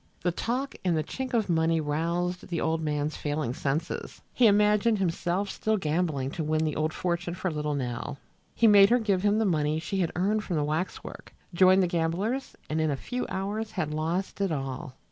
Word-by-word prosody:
The 175 - +1
talk 250 +9 -2
and 175 -3 +2
the 155 - 0
chink 260 - -4
of 220 -3 +2
the 175 - 0
money 160 0 +2
roused 170 +4 -1
the 170 -2 -2
old 160 0 0
man's 150 0 -1
failing 145 -4 -2
senses. 145 +6 -3
He 245 - +5
imagined 210 +2 +4
himself 180 +1 -1
still 220 0 0
gambling 155 -5 -1
to 160 - -3
win 155 +1 +1
the 155 - -1
old 155 +1 0
fortune 170 0 -2
for 185 -1 -2
little 150 -1 -2
Nell. 125 +1 -4 0.4
He 230 - +3
made 205 -2 +8
her 245 - +5
give 205 -6 +1
him 205 +1 +3
the 220 - +2
money 155 -4 +1
she 195 +4 -3
had 175 -3 +1
earned 205 +5 +1
from 180 - -3
the 150 - +1
waxwork, 155 +5 -4 0.2
joined 185 +2 +6
the - - +2
gamblers 175 +10 -1
and 155 +1 -1
in 155 - +1
a 140 - -1
few 250 - -4
hours 210 +3 -3
had 155 -7 -2
lost 170 +6 -2
it 195 -3 +1
all. 135 -1 -4
170 Hz, 205 wpm, -28 LUFS, 155-200 Hz, 0.4 s, made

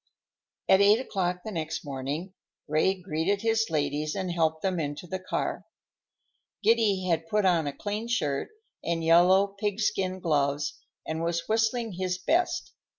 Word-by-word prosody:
At 190 - +6
eight 205 +3 +6
o'clock 180 -7 -2
the 220 - -4
next 160 -4 -4
morning 145 +7 -4 0.3
Ray 155 +6 +2
greeted 180 +4 -1
his 225 0 +2
ladies 150 0 -1
and 190 -2 -2
helped 160 -2 0
them 185 -3 0
into 145 +2 -4
the 185 +2 -4
car. 185 - -3 1.0
Giddy 210 -4 +3
had 165 -2 0
put 210 +2 +1
on 170 -5 +3
a - - -1
clean 210 +2 -3
shirt 150 -13 -1 0.3
and 165 -1 -1
yellow 175 +4 +6
pig 205 0 -1
skin 185 -3 0
gloves 145 -3 0 0.3
and 160 +1 -3
was 170 0 -1
whistling 225 +1 +1
his 185 0 -2
best. 330 - 0
180 Hz, 150 wpm, -28 LUFS, 160-205 Hz, 1.0 s, At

